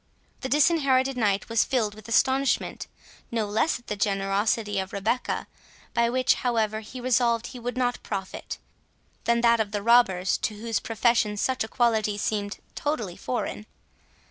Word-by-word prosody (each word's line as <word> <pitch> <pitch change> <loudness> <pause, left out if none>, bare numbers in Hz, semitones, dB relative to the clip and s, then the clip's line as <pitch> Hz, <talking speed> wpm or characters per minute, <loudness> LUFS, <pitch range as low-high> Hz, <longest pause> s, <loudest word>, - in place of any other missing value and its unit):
The 260 - -4
Disinherited 275 -3 +3
Knight 205 -5 +1
was 230 -1 +3
filled 225 -6 0
with 215 -1 -13
astonishment, 265 +3 +1 0.4
no 225 -2 -1
less 215 +10 +1
at 240 - -20
the 210 - -3
generosity 200 +1 0
of 190 0 -5
Rebecca, 210 +5 -1 0.5
by 235 0 +2
which, 255 +1 +3
however, 220 -3 0
he 220 +4 -9
resolved 240 -2 +2
he 255 - -8
would 245 +1 -4
not 245 -1 0
profit, 195 -2 -5 0.7
than 235 0 +2
that 235 -1 +4
of 215 -2 0
the 205 -1 -3
robbers, 200 -6 +4
to 215 - -2
whose 225 +1 -2
profession 225 -2 +1
such 260 +4 0
a - - -5
quality 220 -3 +1
seemed 205 0 -2 0.2
totally 265 - -2
foreign. 230 -3 -4
230 Hz, 155 wpm, -26 LUFS, 210-245 Hz, 0.7 s, that